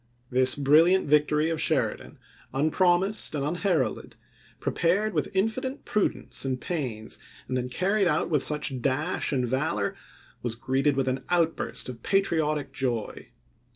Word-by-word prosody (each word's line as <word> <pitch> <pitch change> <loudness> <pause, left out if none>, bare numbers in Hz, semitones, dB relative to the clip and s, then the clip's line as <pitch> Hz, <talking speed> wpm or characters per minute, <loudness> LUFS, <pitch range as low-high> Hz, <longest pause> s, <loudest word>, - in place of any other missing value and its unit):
This 130 +1 +6
brilliant 155 +7 +4
victory 150 +2 +2
of 160 - -2
Sheri - - +1
dan, - - -14 0.4
unpromised 175 +6 +2
and 140 -1 -1
unheralded, 170 -2 -1 0.4
prepared 200 +6 0
with 150 - -1
infinite 255 +7 -1
prudence 210 - -1
and 130 -1 -2
pains, 125 -10 -4 0.3
and 130 - -3
then 125 0 -2
carried 195 +8 +1
through - - +1
with 150 -5 +2
such 145 -4 +1
dash 145 +7 -1
and 130 -3 0
valor, 125 -5 -1 0.5
was 120 -2 -3
greeted 135 +3 0
with 135 -1 0
an 130 +1 -1
outburst 170 -2 0
of 125 -3 -8
patriotic 160 -6 0
joy. 120 -5 -3
150 Hz, 140 wpm, -26 LUFS, 130-175 Hz, 0.5 s, This